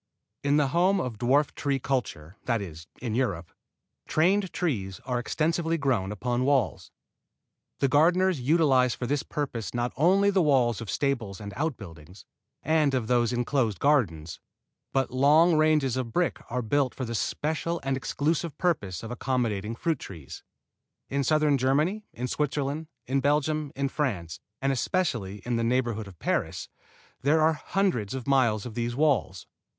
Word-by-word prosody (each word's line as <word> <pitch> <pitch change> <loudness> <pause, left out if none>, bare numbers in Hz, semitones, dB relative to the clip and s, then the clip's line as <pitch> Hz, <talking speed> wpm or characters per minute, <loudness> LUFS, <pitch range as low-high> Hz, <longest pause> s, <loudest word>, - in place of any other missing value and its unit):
In 145 +1 +3
the 145 -3 +2
home 185 +6 +3
of 120 - -4
dwarf 135 +4 +2
tree 140 -2 -1
culture, 110 - -3
that 115 -2 +1
is, 80 -4 -8 0.2
in 115 -4 -2
Europe, 100 -9 -1 0.6
trained 190 +4 +2
trees 100 - -2
are 125 -2 -1
extensively 165 +6 0
grown 125 -10 0
upon 120 +4 -1
walls. 135 -6 +1 0.9
The 140 - +4
gardeners 170 +3 +3
utilize 130 -4 +3
for 125 - -4
this 140 +3 0
purpose 125 -7 -4
not 120 0 -1
only 195 +7 +4
the 190 -1 +3
walls 125 - +2
of 115 - -7
stables 115 -5 -1
and 100 -1 -7
outbuildings, 95 - -6 0.4
and 155 -3 +2
of 125 -3 0
the 120 +1 +3
enclosed 120 -3 0
gardens, 85 - +1 0.5
but 135 -1 0
long 150 +6 +5
ranges 155 -4 +3
of 125 -3 -3
brick 175 +7 0
are 125 +1 -2
built 135 +3 +1
for 130 - -3
the 115 - -5
special 160 +8 -2
and 135 0 0
exclusive 150 +4 -1
purpose 115 - -1
of 115 - -6
accommodating 115 -4 -1
fruit 165 +6 -1
trees. 80 -4 -9 0.7
In 140 0 0
southern 150 0 +3
Germany, 155 - +1
in 125 +2 -4
Switzerland, 145 +2 -2 0.2
in 135 +2 0
Belgium, 150 +1 0
in 140 0 0
France, 95 - -3 0.2
and 135 - +2
especially 120 - -1
in 120 -1 0
the 115 - 0
neighborhood 115 -3 0
of 95 -3 -13
Paris, - - -2 0.5
there 145 +4 +3
are 160 +1 +4
hundreds 150 - -1
of 130 - -5
miles 120 -7 +2
of 120 - -6
these 120 +1 -2
walls. 130 - +1
130 Hz, 155 wpm, -27 LUFS, 115-150 Hz, 0.9 s, long